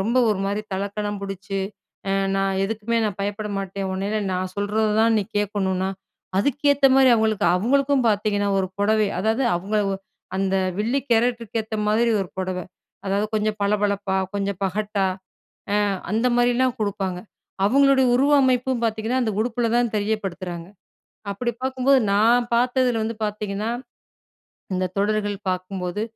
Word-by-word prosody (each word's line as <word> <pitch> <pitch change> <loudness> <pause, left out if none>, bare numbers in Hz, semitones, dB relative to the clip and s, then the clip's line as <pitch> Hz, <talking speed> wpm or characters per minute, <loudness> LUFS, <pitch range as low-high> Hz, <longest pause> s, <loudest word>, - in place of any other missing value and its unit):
ரொம்ப 235 +6 +1
ஒரு 205 - 0
மாரி 205 +2 -2
தலக்கணம் 200 +1 -3
புடிச்சு, 195 0 -4 0.5
அ - - +1 0.2
நான் 195 0 0
எதுக்குமே 225 +2 -2
நான் 200 -2 -4
பயப்பட 205 +1 -3
மாட்டேன். 195 0 -4
உன்னையில 200 +3 -1
நான் 185 0 -2
சொல்றததான் 220 +2 +2
நீ 200 - -1
கேட்கணுனா, 190 -2 -1 0.5
அதுக்கேத்த 285 +4 +3
மாரி 265 -1 +6
அவங்களுக்கு 220 -2 +1
அவங்களுக்கும் 270 +4 +2
பார்த்தீங்கன்னா 205 -1 +1
1 190 - +1
புடவை. 210 0 +2
அதாவது 220 +5 +1
அவங்கள 205 +4 -1
ஒ - - 0 0.4
அந்த 195 0 0 0.2
வில்லி 235 +6 +1
கேரக்டருக்கு 230 -1 +1
ஏத்த 220 0 -7
மாதிரி 230 +2 +3
1 185 - -3
புடவ. 185 -1 -2 0.5
அதாவது 200 +2 +1
கொஞ்சம் 215 0 0
பளபளப்பா, 200 -1 0 0.2
கொஞ்சம் 200 -2 -2
பகட்டா 200 +1 -1 0.7
அ - - +3 0.4
அந்த 225 +3 +2
மாரிலாம் 245 +1 +2
குடுப்பாங்க. 195 -3 -2 0.5
அவங்களுடைய 275 +1 +4
உருவமைப்பும் 260 -2 +3
பார்த்தீங்கன்னா, 225 +3 0
அந்த 220 -2 0
உடுப்புல 235 0 0
தான் 240 -2 +2
தெரியப்படுத்துறாங்க. 190 -5 -3 0.6
அப்டி 240 +5 -2
பார்க்கும்போது 265 +1 +3
நான் 235 +4 +4
பாத்ததில 245 -1 +2
வந்து 225 0 -3
பார்த்தீங்கன்னா, 210 +1 -3 1.1
இந்த 185 0 0
தொடர்கள் 205 0 0
பார்க்கும்போது 185 +1 -3
210 Hz, 135 wpm, -23 LUFS, 195-235 Hz, 1.1 s, மாரி